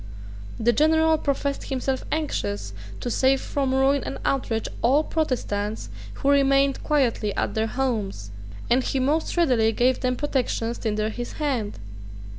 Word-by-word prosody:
The 235 +1 +3
general 320 +2 +4
professed 280 -1 -2
himself 265 0 -2
anxious 100 - -2 0.3
to 245 - -3
save 265 +3 +3
from 275 -1 -1
ruin 270 +1 +3
and - - -5
outrage 230 -5 0
all 275 +6 +4
Protestants 220 -10 -2 0.3
who 280 - +1
remained 275 -1 +3
quietly 245 -8 +1
at - - -1
their 220 0 0
homes; 215 - -2 0.4
and 245 +2 +3
he 270 - -1
most 300 +6 0
readily 245 -10 +3
gave 250 +3 +2
them 255 -1 0
protections 245 -4 -1
tinder 215 -1 -1
his 240 +2 -6
hand. 260 -9 -2
260 Hz, 140 wpm, -24 LUFS, 225-280 Hz, 0.4 s, general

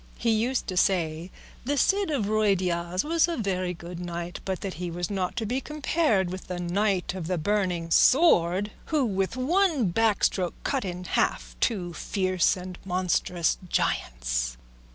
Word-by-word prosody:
He 230 - +1
used 235 +4 +1
to 185 - -4
say 170 -2 +1 0.3
the 285 +3 -1
Cid 395 +4 +2 0.2
Ruy 215 -1 +3
Diaz 175 0 -1
was 330 +2 +2
a 340 - -2
very 185 -5 -1
good 170 +1 -8
knight, 175 0 -5
but 190 -2 -3
that 195 -2 -4
he 175 - -2
was 175 +3 -4
not 185 -2 -2
to 230 - -2
be 250 +5 -1
compared 295 - 0
with 185 0 -7
the 180 -1 -4
Knight 190 +2 0
of 180 -4 -5
the 180 0 0
Burning 180 -2 -1
Sword 205 - +4
who 300 -4 +1
with 195 +1 -1
one 305 - +2
back 220 +3 +1
stroke 180 -3 +1
cut 270 -2 0
in 180 -1 -5
half - - -1
two 180 -7 0
fierce 185 +1 +1
and 180 0 -8
monstrous 180 -2 0
giants. - - -1
185 Hz, 165 wpm, -27 LUFS, 175-225 Hz, 0.3 s, Sword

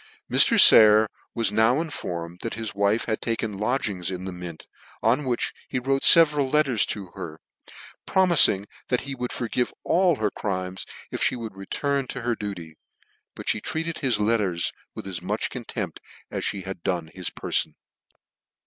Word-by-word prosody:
Mr. - - +6
Sayer 110 0 +8 0.3
was 115 -4 +1
now 110 +6 +3
informed 90 - -5
that 115 - -4
his 110 -1 -5
wife 100 +3 +1
had 110 -1 -2
taken 110 -3 -3
lodgings 105 -6 -1
in 95 0 -5
the 95 - -5
Mint, 90 -2 -9 0.4
on 125 +6 +2
which 125 -2 -1 0.2
he - - -2
wrote 135 +2 0
fcveral 150 -5 +6
letters 140 -8 +2
to 95 -4 -5
her, 80 -1 -8 0.7
promising 170 - +4 0.2
that 125 - 0
he 140 - -6
would 125 -2 -4
forgive 120 +1 -2
all 175 -1 +2
her 110 -5 -1
crimes, 95 -2 -4 0.2
if - - +1
(he - - -2
would 115 -4 -7
return 135 +8 -2
to 125 - -6
her 120 0 0
duty: 90 -7 -7 0.6
but - - -9
fhe - - 0
treated 165 +1 -3
his 130 -4 +1
lerters 105 -5 0 0.2
with - - -8
as 95 -3 -5
much - - -3
contempt - - -6 0.3
as - - -1
(he 100 - -3
had 95 -1 -7
done 85 -3 -3
his 90 -2 -3
perfon. - - -1
110 Hz, 165 wpm, -24 LUFS, 95-130 Hz, 0.7 s, Sayer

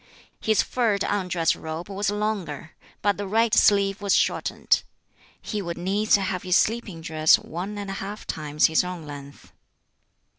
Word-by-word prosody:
His 220 -1 +2
furred 220 -5 0
undress 180 -5 0
robe 160 +2 -6
was 200 0 -2
longer, 200 -8 -3 0.3
but 205 -2 +2
the 205 -1 -4
right 225 +3 +2
sleeve 200 -1 +4
was 200 -1 +2
shortened. - - +1 0.6
He 210 -2 -4
would 170 -3 -5
needs 200 +5 +2
have 190 -2 -1
his 180 +1 +3
sleeping 215 -7 -1
dress 155 -1 +4
one 190 +6 -6
and 200 -1 -5
a 195 - -5
half 205 +2 -6
times 150 -1 0
his 160 +2 +3
own 180 -3 -6
length. 140 -1 -11
195 Hz, 155 wpm, -25 LUFS, 165-205 Hz, 0.6 s, sleeve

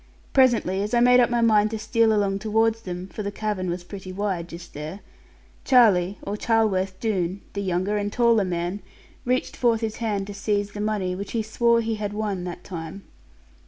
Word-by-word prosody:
Presently, 235 -8 +3
as 210 +3 -1
I - - +4
made 250 +1 +6
up 240 - +4
my 240 -1 +1
mind 215 -2 +4
to 220 - -3
steal 220 +1 +2
along 200 -2 +1
towards 225 +2 +1
them 180 -2 -6
(for 195 - -7
the 200 -1 -3
cavern 205 -3 -2
was 175 +1 -3
pretty 185 0 -8
wide, 185 -3 -2
just 175 0 -10
there), 155 +7 -7 0.6
Charlie, 205 -8 +4
or 200 - -3
Charleworth 200 -4 +1
Doone, 190 -4 -1
the 200 - -3
younger 190 +2 0
and 205 0 -2
taller 235 -3 +3
man, 175 +1 -2 0.5
reached 250 +1 0
forth 235 -2 +2
his 220 -1 -3
hand 210 -4 -1
to 205 - -7
seize 205 0 -1
the 205 - -6
money, 210 -4 -1
which 195 +2 -6
he 225 -2 0
swore 235 +2 +2
he 225 0 -2
had 205 -1 -3
won 205 -4 -2
that 175 0 -7
time. 175 +1 -7
205 Hz, 195 wpm, -24 LUFS, 185-225 Hz, 0.6 s, made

